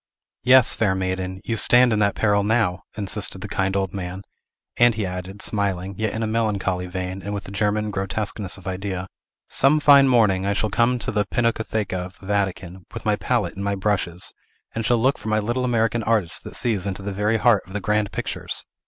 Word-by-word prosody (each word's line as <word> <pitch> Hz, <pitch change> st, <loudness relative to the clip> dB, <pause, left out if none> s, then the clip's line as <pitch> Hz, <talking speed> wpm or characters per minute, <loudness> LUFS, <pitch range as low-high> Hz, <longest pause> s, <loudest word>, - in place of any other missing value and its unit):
"Yes, 130 Hz, -1 st, +6 dB
fair 100 Hz, -4 st, +1 dB
maiden, 95 Hz, 0 st, -3 dB
you 115 Hz, -, -1 dB
stand 120 Hz, +3 st, +5 dB
in 105 Hz, -, +1 dB
that 100 Hz, -1 st, +2 dB
peril 105 Hz, -2 st, +2 dB
now!" 105 Hz, -4 st, +1 dB, 0.2 s
insisted 100 Hz, -1 st, -2 dB
the 105 Hz, -, -5 dB
kind 95 Hz, -1 st, -1 dB
old 95 Hz, -2 st, -1 dB
man; 95 Hz, 0 st, -5 dB, 0.5 s
and 120 Hz, -1 st, +5 dB
he 105 Hz, -2 st, -1 dB
added, 90 Hz, +2 st, -6 dB
smiling, 100 Hz, -2 st, -1 dB
yet 110 Hz, +1 st, -1 dB
in 110 Hz, -, -2 dB
a -, -, +1 dB
melancholy 100 Hz, -5 st, -1 dB
vein, 90 Hz, +1 st, -4 dB
and 100 Hz, +3 st, -4 dB
with 100 Hz, -, -6 dB
a -, -, -8 dB
German 105 Hz, +1 st, 0 dB
grotesqueness 100 Hz, 0 st, -3 dB
of 95 Hz, -, -15 dB
idea, 95 Hz, 0 st, -4 dB, 0.4 s
"Some 140 Hz, +3 st, +3 dB
fine 140 Hz, -2 st, +7 dB
morning, 105 Hz, -7 st, +3 dB
I 100 Hz, +1 st, +1 dB
shall 105 Hz, +1 st, -1 dB
come 120 Hz, +3 st, +2 dB
to -, -, -3 dB
the 105 Hz, -1 st, 0 dB
Pinacotheca 110 Hz, -5 st, -1 dB
of 90 Hz, +1 st, -10 dB
the -, -, -14 dB
Vatican, 95 Hz, -2 st, -2 dB
with -, -, -7 dB
my -, -, +3 dB
palette -, -, -1 dB
and 100 Hz, -, -6 dB
my 100 Hz, 0 st, 0 dB
brushes, 95 Hz, -3 st, -1 dB, 0.4 s
and 115 Hz, -, -2 dB
shall 120 Hz, +2 st, +3 dB
look 130 Hz, +4 st, +2 dB
for -, -, -9 dB
my 110 Hz, 0 st, +2 dB
little 120 Hz, +4 st, -1 dB
American 115 Hz, -1 st, +1 dB
artist 110 Hz, -6 st, 0 dB
that -, -, -8 dB
sees 105 Hz, -5 st, -1 dB
into 95 Hz, 0 st, -4 dB
the 100 Hz, 0 st, -4 dB
very 105 Hz, +3 st, +1 dB
heart 115 Hz, -3 st, +4 dB
of 95 Hz, -, -12 dB
the 105 Hz, -, -1 dB
grand 105 Hz, 0 st, 0 dB
pictures! -, -, -4 dB
100 Hz, 210 wpm, -23 LUFS, 95-110 Hz, 0.5 s, fine